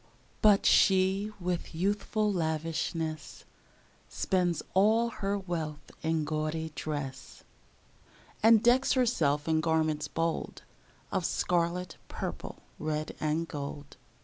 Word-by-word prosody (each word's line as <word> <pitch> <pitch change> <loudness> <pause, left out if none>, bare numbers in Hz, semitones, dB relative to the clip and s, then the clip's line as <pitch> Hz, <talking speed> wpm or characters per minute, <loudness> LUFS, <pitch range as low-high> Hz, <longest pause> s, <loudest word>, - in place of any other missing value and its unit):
But 210 -2 +5
she, 190 +2 +4
with 175 -2 -3
youthful 205 +3 0
lavishness, 160 -1 -3 0.6
Spends 180 -3 0
all 220 +5 +4
her 200 -3 -2
wealth 160 -6 -5
in 160 -1 0
gaudy 155 +1 -2
dress, 145 -5 -5 1.0
And 225 0 +6
decks 250 +2 +4
herself 165 - +1
in 160 -1 +2
garments 155 -1 +1
bold 165 0 -2 0.5
Of - - 0
scarlet, 175 +1 0
purple, - - -6 0.2
red, 155 0 -3
and 155 +2 0
gold. 145 -1 -7
165 Hz, 100 wpm, -30 LUFS, 155-195 Hz, 1.0 s, And